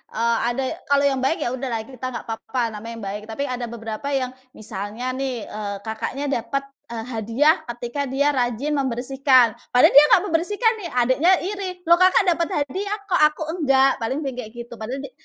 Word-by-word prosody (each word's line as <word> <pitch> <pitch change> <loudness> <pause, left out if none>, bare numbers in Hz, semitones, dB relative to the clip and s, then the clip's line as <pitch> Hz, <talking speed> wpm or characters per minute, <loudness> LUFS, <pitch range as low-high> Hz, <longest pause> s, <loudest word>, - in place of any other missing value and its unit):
eee, 230 +1 +2
ada 255 +2 -1
ya 260 - -2
kalau 285 0 +3
yang 265 - -1
baik 270 +7 +1
ya - - 0
udahlah 250 -4 -3
kita 255 +1 -9
nggak 250 - -5
apa-apa 230 +3 -4
namanya 225 +2 -7
yang 225 - -9
baik 200 +2 -4
tapi 225 +6 -4
ada 250 -3 -3
beberapa 225 +3 -6
yang 255 -1 -1 0.2
misalnya 215 +4 -5
nih, 260 -3 -3
eee, 205 -1 -5
kakaknya 225 +5 -4 0.2
dapet, 275 +4 -3 0.2
eee, 230 -1 -5
hadiah 230 - +3 0.2
ketika 240 +4 -4
dia 285 +3 +2
rajin 250 +2 -1
membersihkan, 260 0 +3 0.3
padahal 250 - +7
dia 285 +2 +9
enggak 360 - +5
membersihkan 410 +6 +1
nih 355 - -5
adiknya 260 +9 +3
iri, 395 0 -3 0.2
loh 340 +1 +5
kakak 370 +2 +5
dapet 335 0 0 0.2
hadiah 395 +9 -3 0.2
kok - - +3
aku 305 +1 -6 0.2
enggak? 270 -2 +3
Paling 265 +7 -2
bilang 270 -2 -4
kayak 220 -3 -7
gitu 235 0 -8
padahal 255 +5 -5
dia - - -8
260 Hz, 195 wpm, -22 LUFS, 230-285 Hz, 0.3 s, dia